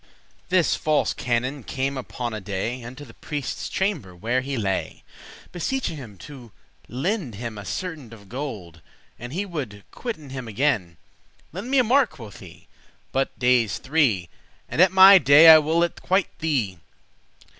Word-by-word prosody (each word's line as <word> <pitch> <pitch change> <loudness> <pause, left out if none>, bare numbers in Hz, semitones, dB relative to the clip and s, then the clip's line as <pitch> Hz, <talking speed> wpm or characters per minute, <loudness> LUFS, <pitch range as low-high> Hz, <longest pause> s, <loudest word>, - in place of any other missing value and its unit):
This 180 -2 +3
false 155 -1 +1
canon 125 +4 -2
came 135 +4 -3
upon 125 -2 -5
a 110 - -5
day 105 +6 -4
Unto 130 +5 -9
the 115 - -15
prieste's 145 -4 -5
chamber, 165 - -2
where 120 +8 -1
he 135 +1 -4
lay, 95 -4 -3 0.5
Beseeching 180 +1 -2
him 115 -9 -10
to 130 -6 -12 0.4
lend 150 - -3
him 115 +1 -6
a 105 -2 -9
certain 155 - -5
Of 105 -3 -14
gold, 105 - -7 0.4
and 120 +1 -8
he 190 +7 -2
would 130 - -6
quit 235 -3 -5
it 145 -4 -13
him 130 -3 -6
again. 105 - -1 0.6
"Lend 195 +8 -6
me 275 - +2
a 255 - +5
mark," 250 0 +3
quoth 115 -9 -11
he, - - -14 0.5
"but 135 0 -1
dayes 125 -5 +2
three, 130 - +1 0.4
And 165 - 0
at 185 - +6
my 190 +1 +9
day 150 +2 +8
I 160 -1 +10
will 160 +3 +1
it 170 - -3
quite 190 0 0
thee. 125 - -1
135 Hz, 165 wpm, -23 LUFS, 115-165 Hz, 0.6 s, I